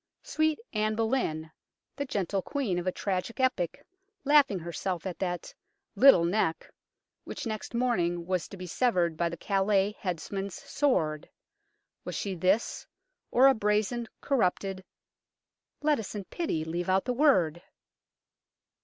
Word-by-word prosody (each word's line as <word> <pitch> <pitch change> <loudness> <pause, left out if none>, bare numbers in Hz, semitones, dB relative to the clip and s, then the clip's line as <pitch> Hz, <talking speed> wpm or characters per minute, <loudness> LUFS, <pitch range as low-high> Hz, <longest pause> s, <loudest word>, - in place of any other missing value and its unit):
" - - -56
Sweet 315 0 +1 0.2
Anne 215 0 0
Boleyn," 220 -9 -1 0.4
the 280 - -3
gentle 195 -5 -1
Queen 225 -8 -1
of 175 - -5
a - - +3
tragic 195 +5 -3
epoch, 255 -10 0 0.4
laughing 285 -8 +5
herself 175 +1 -4
at 185 -2 -5
that 175 -2 -3 0.2
" - - -54
lyttel 220 -11 +7
neck 175 -3 -1 0.3
" - - -60
which - - -6
next 220 +1 -5
morning 175 -9 0
was 185 -1 -1
to 195 - -10
be 180 - -7
severed 180 -4 +1
by 170 +1 0
the 170 - -6
Calais 195 +2 +1
headsman's 195 +2 -4
sword, 160 - 0 0.7
was - - -5
she 200 - -2
this, 185 +5 0 0.4
or 255 +2 +5
a 270 - +8
brazen, 215 +2 0
corrupted 195 -6 0 1.0
let 300 -3 +3
us 215 -1 -6
in 205 - -4
pity 185 - -3
leave 175 +3 -3
out 190 +1 +2
the 250 - 0
word 185 - +3
195 Hz, 145 wpm, -29 LUFS, 175-240 Hz, 1.0 s, a